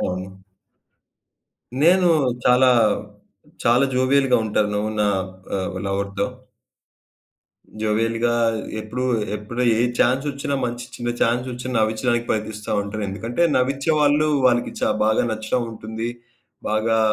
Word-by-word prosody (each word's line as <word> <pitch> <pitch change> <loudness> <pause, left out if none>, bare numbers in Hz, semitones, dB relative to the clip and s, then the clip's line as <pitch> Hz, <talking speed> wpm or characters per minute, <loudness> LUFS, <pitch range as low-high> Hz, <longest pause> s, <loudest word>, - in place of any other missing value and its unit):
అవును. 95 +1 -4 1.4
నేను 180 +3 +5 0.4
చాలా, 125 +1 +5 1.0
చాలా 120 +3 +4
జోవియల్‌గా 130 0 +3
ఉంటాను. 105 -1 0 0.2
నా 105 - +3 0.5
ఆహ్, 95 - -4
లవర్‌తో. 100 0 -1 1.6
జోవియల్‌గా 115 +2 +1 0.5
ఎప్పుడు, 115 +4 -5 0.3
ఎప్పుడు 110 +4 -4 0.2
ఏ - - +2 0.2
చాన్స్ 130 +3 +2
ఒచ్చినా 140 0 -3
మంచి 120 0 -4
చిన్న 120 -1 -3
చాన్స్ 120 +2 +1
ఒచ్చినా 125 +1 -5
నవ్వించడానికి 115 +2 0
ప్రయత్నిస్తా 110 0 -3
ఉంటానెందుకంటే, 105 - -3
నవ్వించే 135 +4 +1
వాళ్ళు, 150 +1 +3 0.2
వాళ్ళకి 120 -1 +1
చా - - +2
బాగా 110 0 +2
నచ్చడం 110 +3 -1
ఉంటుంది. 110 +1 -5 0.6
బాగా 110 +1 +1
115 Hz, 105 wpm, -22 LUFS, 110-125 Hz, 1.6 s, నేను